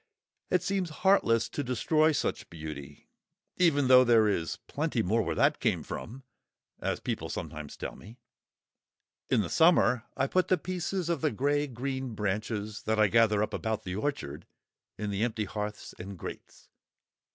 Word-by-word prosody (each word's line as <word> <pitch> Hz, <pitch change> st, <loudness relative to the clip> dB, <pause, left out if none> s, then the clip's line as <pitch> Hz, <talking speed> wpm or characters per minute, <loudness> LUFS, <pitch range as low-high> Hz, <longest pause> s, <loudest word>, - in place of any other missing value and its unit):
It 180 Hz, -, +2 dB
seems 195 Hz, -3 st, -1 dB, 0.2 s
heartless 115 Hz, -, +4 dB
to 145 Hz, -, -3 dB
destroy 155 Hz, +6 st, +2 dB
such 145 Hz, -, -2 dB
beauty, 75 Hz, -3 st, -8 dB, 0.5 s
even 145 Hz, -7 st, +3 dB
though 130 Hz, 0 st, +8 dB
there 115 Hz, -3 st, +5 dB
is 85 Hz, -5 st, -1 dB
"plenty -, -, -1 dB
more 110 Hz, +6 st, +2 dB
where -, -, -2 dB
that -, -, +3 dB
came -, -, 0 dB
from," 130 Hz, +4 st, -7 dB, 0.6 s
as -, -, -2 dB
people -, -, -3 dB
sometimes 75 Hz, -2 st, -6 dB
tell -, -, -5 dB
me. 110 Hz, +6 st, -13 dB, 1.1 s
In -, -, +3 dB
the 95 Hz, -, -2 dB
summer 140 Hz, -8 st, +4 dB
I -, -, +2 dB
put 185 Hz, +6 st, +1 dB
the 185 Hz, -, +3 dB
pieces 180 Hz, 0 st, -3 dB
of 170 Hz, -5 st, -1 dB
the 155 Hz, -, +2 dB
grey 145 Hz, +4 st, 0 dB
green 130 Hz, -1 st, -4 dB
branches, 105 Hz, +1 st, -2 dB
that 110 Hz, 0 st, +2 dB
I 105 Hz, -1 st, +5 dB
gather 110 Hz, -2 st, +4 dB
up -, -, -4 dB
about 110 Hz, -1 st, -2 dB
the 90 Hz, -, -4 dB
orchard, 110 Hz, -, -3 dB, 0.5 s
in 105 Hz, -1 st, -3 dB
the 100 Hz, +1 st, -2 dB
empty 110 Hz, -3 st, -1 dB
hearths 105 Hz, +1 st, -5 dB
and 95 Hz, +1 st, -7 dB
grates. -, -, -9 dB
115 Hz, 165 wpm, -29 LUFS, 105-145 Hz, 1.1 s, though